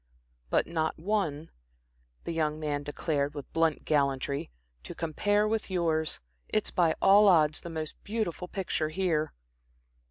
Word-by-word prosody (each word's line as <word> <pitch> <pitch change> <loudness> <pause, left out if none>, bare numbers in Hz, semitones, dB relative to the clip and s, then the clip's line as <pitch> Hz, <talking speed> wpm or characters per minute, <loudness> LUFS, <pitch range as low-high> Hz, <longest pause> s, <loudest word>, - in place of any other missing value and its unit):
"But - - +2
not 160 -1 -1
one," 165 -5 -1 0.7
the - - -4
young 155 -2 0
man 145 -2 -2
declared, 145 0 -2
with 145 - -8
blunt 165 -2 +1
gallantry 140 - 0 0.3
"to - - -9
compare 205 +6 +1
with 220 -1 -1
yours. 165 -4 0 0.3
It's 215 - 0
by 170 -3 +2
all 205 +2 +7
odds 155 -5 +4
the 170 - -7
most 160 -2 -6
beautiful 205 -5 -3
picture 180 -5 -2
here." 160 -3 0
160 Hz, 135 wpm, -29 LUFS, 150-185 Hz, 0.7 s, all